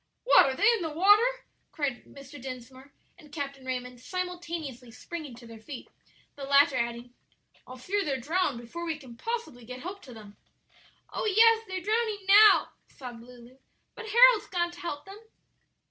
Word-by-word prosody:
"What, -, -, +6 dB
are 265 Hz, -, -2 dB
they 410 Hz, -, +1 dB
in 455 Hz, -, -2 dB
the 325 Hz, -, -2 dB
water?" 415 Hz, +10 st, +3 dB, 0.3 s
cried 280 Hz, -6 st, -3 dB
Mr. 275 Hz, 0 st, -13 dB
Dinsmore 260 Hz, +1 st, -10 dB, 0.3 s
and 300 Hz, -, -17 dB
Captain 280 Hz, -2 st, -6 dB
Raymond, 250 Hz, -1 st, -5 dB
simultaneously 335 Hz, -5 st, -5 dB
springing 275 Hz, +3 st, -8 dB
to 240 Hz, 0 st, -14 dB
their 230 Hz, -1 st, -12 dB
feet; 255 Hz, +4 st, -10 dB, 0.5 s
the 280 Hz, -, -9 dB
latter 280 Hz, 0 st, +4 dB
adding, 235 Hz, 0 st, -3 dB, 0.5 s
"I 255 Hz, -, -10 dB
fear 395 Hz, +10 st, -2 dB
they'll 275 Hz, -5 st, -2 dB
drown 305 Hz, +1 st, -1 dB
before 240 Hz, +9 st, -8 dB
we 325 Hz, -2 st, -3 dB
can 260 Hz, -6 st, -13 dB
possibly 455 Hz, -, -5 dB
get 250 Hz, +2 st, -9 dB
help 385 Hz, +3 st, -7 dB
to 255 Hz, -, -12 dB
them." 210 Hz, -2 st, -13 dB, 0.8 s
"Oh, -, -, -3 dB
yes; 450 Hz, +2 st, +5 dB
they're 375 Hz, -1 st, -4 dB
drowning 430 Hz, -1 st, -1 dB
now," 415 Hz, +2 st, +7 dB, 0.2 s
sobbed 245 Hz, -3 st, -10 dB
Lulu; 245 Hz, +1 st, -16 dB, 0.3 s
"but 450 Hz, -1 st, -9 dB
Harold's 475 Hz, -1 st, +6 dB
gone 345 Hz, -2 st, -1 dB
to 345 Hz, -, -14 dB
help 295 Hz, -4 st, -6 dB
them." 390 Hz, +2 st, -11 dB
290 Hz, 170 wpm, -28 LUFS, 250-385 Hz, 0.8 s, now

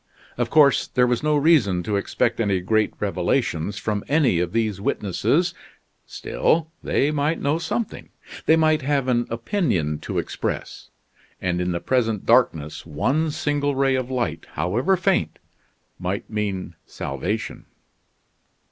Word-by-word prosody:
Of 120 Hz, -1 st, -1 dB
course, 140 Hz, -6 st, +5 dB
there 125 Hz, -, +2 dB
was 125 Hz, -1 st, 0 dB
no 150 Hz, 0 st, +2 dB
reason 135 Hz, -, +3 dB
to 105 Hz, +3 st, -1 dB
expect 100 Hz, -, 0 dB
any 100 Hz, -4 st, +1 dB
great 110 Hz, +4 st, +1 dB
revelations 100 Hz, -1 st, -1 dB
from 105 Hz, -2 st, -2 dB
any 140 Hz, -, +3 dB
of 85 Hz, -1 st, -1 dB
these 110 Hz, -4 st, -1 dB
witnesses, 150 Hz, -, 0 dB, 0.5 s
still 160 Hz, 0 st, 0 dB
they 145 Hz, -, +1 dB
might 150 Hz, +2 st, 0 dB
know 145 Hz, +3 st, 0 dB
something, 195 Hz, +7 st, -4 dB, 0.4 s
they 160 Hz, -, +7 dB
might 155 Hz, -1 st, +3 dB
have 140 Hz, -1 st, 0 dB
an 120 Hz, -2 st, +1 dB
opinion 115 Hz, -, -1 dB
to -, -, -5 dB
express, -, -, -4 dB, 0.5 s
and 90 Hz, -1 st, -1 dB
in 90 Hz, 0 st, -1 dB
the 85 Hz, -, -1 dB
present 115 Hz, -4 st, 0 dB
darkness 85 Hz, -, +2 dB
one 135 Hz, -, 0 dB
single 145 Hz, -1 st, -1 dB
ray 135 Hz, 0 st, +2 dB
of 130 Hz, -1 st, -1 dB
light, 125 Hz, -2 st, -2 dB
however 115 Hz, -, +1 dB
faint, 185 Hz, 0 st, +1 dB, 0.6 s
might 95 Hz, +2 st, -3 dB
mean 105 Hz, -3 st, -3 dB
salvation. 90 Hz, +11 st, -4 dB
120 Hz, 140 wpm, -23 LUFS, 95-145 Hz, 0.6 s, they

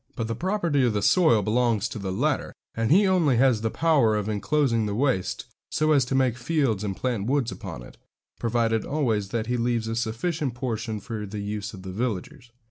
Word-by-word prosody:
But 115 Hz, -4 st, -3 dB
the 115 Hz, -, -2 dB
property 170 Hz, -, 0 dB
of 120 Hz, -3 st, +2 dB
the 105 Hz, -1 st, -1 dB
soil 140 Hz, -, +4 dB
belongs 115 Hz, 0 st, +1 dB
to -, -, -6 dB
the 95 Hz, -1 st, -3 dB
latter, 135 Hz, +9 st, -1 dB, 0.2 s
and 115 Hz, 0 st, -1 dB
he 200 Hz, +5 st, +6 dB
only 170 Hz, -9 st, +3 dB
has 125 Hz, -3 st, +3 dB
the 110 Hz, -, 0 dB
power 140 Hz, -7 st, +3 dB
of 105 Hz, -1 st, -1 dB
enclosing 115 Hz, +1 st, +1 dB
the 100 Hz, -, -2 dB
waste 125 Hz, -6 st, 0 dB, 0.2 s
so 155 Hz, 0 st, +1 dB
as 140 Hz, -4 st, +4 dB
to 135 Hz, -, -2 dB
make 130 Hz, -3 st, +2 dB
fields 130 Hz, -6 st, 0 dB
and 100 Hz, -2 st, -3 dB
plant 120 Hz, -5 st, -2 dB
woods 135 Hz, -3 st, +1 dB
upon -, -, -7 dB
it, -, -, -14 dB, 0.4 s
provided 115 Hz, -1 st, +1 dB
always 115 Hz, -9 st, -1 dB
that 110 Hz, +1 st, -2 dB
he 125 Hz, +2 st, -1 dB
leaves 120 Hz, -1 st, 0 dB
a 115 Hz, -, -2 dB
sufficient 120 Hz, +4 st, -2 dB
portion 110 Hz, -3 st, -3 dB
for 110 Hz, -2 st, -6 dB
the 105 Hz, +2 st, -7 dB
use 105 Hz, 0 st, -4 dB
of 95 Hz, -, -11 dB
the 95 Hz, -, -6 dB
villagers. 120 Hz, +5 st, -4 dB
115 Hz, 210 wpm, -25 LUFS, 110-135 Hz, 0.4 s, he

